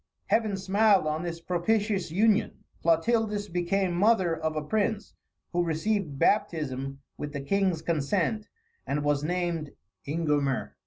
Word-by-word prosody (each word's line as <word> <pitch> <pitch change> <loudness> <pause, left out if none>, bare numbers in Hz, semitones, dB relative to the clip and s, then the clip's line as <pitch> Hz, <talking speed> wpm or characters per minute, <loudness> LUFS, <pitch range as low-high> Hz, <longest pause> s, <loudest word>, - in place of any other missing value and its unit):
Heaven 215 -3 +2
smiled 195 0 +3
on 155 +1 -1
this 170 -1 -4
propitious 195 +3 0
union; 210 +5 +1 0.2
Clotildis 210 +5 +2
became 180 +1 0
mother 185 -2 +3
of 160 -1 -3
a 155 - -2
prince, 210 +5 -1 0.4
who 175 0 +2
received 165 -1 -1
baptism 135 -9 0 0.2
with 145 -1 -5
the 140 - -3
king's 185 +1 0
consent, 175 +7 0 0.4
and 145 +1 -1
was 145 -1 +1
named 170 -2 -2 0.3
Ingomer. 145 -3 0
175 Hz, 125 wpm, -28 LUFS, 155-205 Hz, 0.4 s, smiled